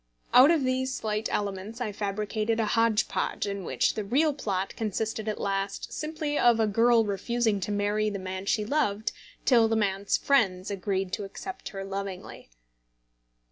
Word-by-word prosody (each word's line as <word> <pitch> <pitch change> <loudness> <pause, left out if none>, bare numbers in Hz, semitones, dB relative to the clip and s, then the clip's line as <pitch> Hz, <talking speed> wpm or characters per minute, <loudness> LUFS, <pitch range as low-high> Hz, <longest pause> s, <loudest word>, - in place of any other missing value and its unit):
Out 255 +4 +9
of 325 -4 +3
these 260 0 0
slight 215 0 -2
elements 200 +3 -3
I 235 -4 -2
fabricated 215 +2 -2
a 225 - +2
hodge 225 0 +2
podge - - -2
in 200 -1 -4
which - - +1
the 215 - -3
real 285 +9 +2
plot 195 -8 -3
consisted 220 0 -2
at 215 - -2
last 195 0 -2
simply 305 -1 -2
of 240 -2 +5
a 220 - +4
girl 230 +2 +4
refusing 210 +2 0
to 200 - -3
marry 205 +1 +1
the 205 - -4
man 185 0 -5
she 210 0 +1
loved 220 -5 0 0.3
till 235 -4 +5
the 225 - +1
man's 200 -2 +1
friends 200 -9 +1
agreed 195 -1 -2
to 205 - -2
accept 380 - -7
her 195 -1 -6
lovingly. 195 - -6
215 Hz, 170 wpm, -27 LUFS, 200-235 Hz, 0.3 s, Out